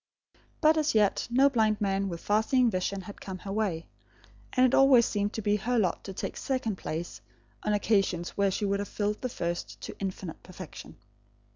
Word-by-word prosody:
But 310 Hz, +1 st, +5 dB
as 300 Hz, -5 st, +1 dB
yet, 210 Hz, -2 st, +3 dB
no 260 Hz, +4 st, +5 dB
blind 220 Hz, -5 st, +2 dB
man 195 Hz, -1 st, 0 dB
with 170 Hz, -2 st, -6 dB
far 210 Hz, +1 st, +2 dB
seeing 250 Hz, +1 st, +3 dB
vision 190 Hz, +1 st, -2 dB
had 200 Hz, +2 st, -11 dB
come 190 Hz, -1 st, -6 dB
her 195 Hz, +1 st, -7 dB
way; 195 Hz, -6 st, -1 dB, 0.7 s
and 255 Hz, -1 st, +4 dB
it 255 Hz, -, +2 dB
always 265 Hz, -3 st, +6 dB
seemed 205 Hz, 0 st, -1 dB
to 220 Hz, -, -4 dB
be 205 Hz, +1 st, +2 dB
her 245 Hz, +5 st, -1 dB
lot 190 Hz, -6 st, +1 dB
to 195 Hz, -, -5 dB
take -, -, -5 dB
a -, -, -5 dB
second 250 Hz, -7 st, -2 dB
place, 165 Hz, +2 st, -5 dB, 0.4 s
on 210 Hz, -, 0 dB
occasions 195 Hz, -4 st, +1 dB
when 200 Hz, -1 st, +1 dB
she 200 Hz, +2 st, -1 dB
would 200 Hz, 0 st, 0 dB
have 205 Hz, -, -3 dB
filled 210 Hz, 0 st, -2 dB
the 255 Hz, -, -2 dB
first 170 Hz, -6 st, -4 dB
to -, -, -7 dB
infinite 190 Hz, -3 st, -5 dB
perfection. 185 Hz, -2 st, -10 dB
205 Hz, 200 wpm, -29 LUFS, 190-230 Hz, 0.7 s, always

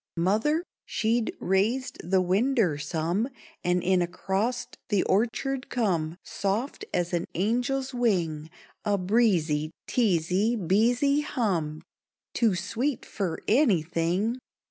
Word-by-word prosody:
Mother 220 Hz, -, +2 dB, 0.2 s
she'd 230 Hz, +1 st, 0 dB
raised 215 Hz, +8 st, 0 dB
the 185 Hz, +2 st, +2 dB
winder 195 Hz, -, +2 dB
some; 165 Hz, -, -1 dB, 0.3 s
And 180 Hz, 0 st, +1 dB
in 185 Hz, 0 st, +3 dB
acrost 195 Hz, +7 st, -2 dB
the 205 Hz, -4 st, +2 dB
orchard 255 Hz, +6 st, 0 dB
come, 175 Hz, -9 st, 0 dB
Soft 220 Hz, -, -2 dB
as 175 Hz, 0 st, -1 dB
an 170 Hz, -1 st, 0 dB
angel's 250 Hz, +7 st, 0 dB
wing, 170 Hz, -11 st, 0 dB, 0.3 s
A 205 Hz, -1 st, +1 dB
breezy, 180 Hz, -7 st, +2 dB, 0.2 s
treesy, 200 Hz, +1 st, +2 dB
beesy 235 Hz, -, +3 dB
hum, 170 Hz, -, -1 dB, 0.5 s
Too 225 Hz, -5 st, +2 dB
sweet 230 Hz, +9 st, -2 dB
fer 185 Hz, -6 st, -3 dB
anything! 195 Hz, -, +2 dB
200 Hz, 105 wpm, -27 LUFS, 175-240 Hz, 0.5 s, in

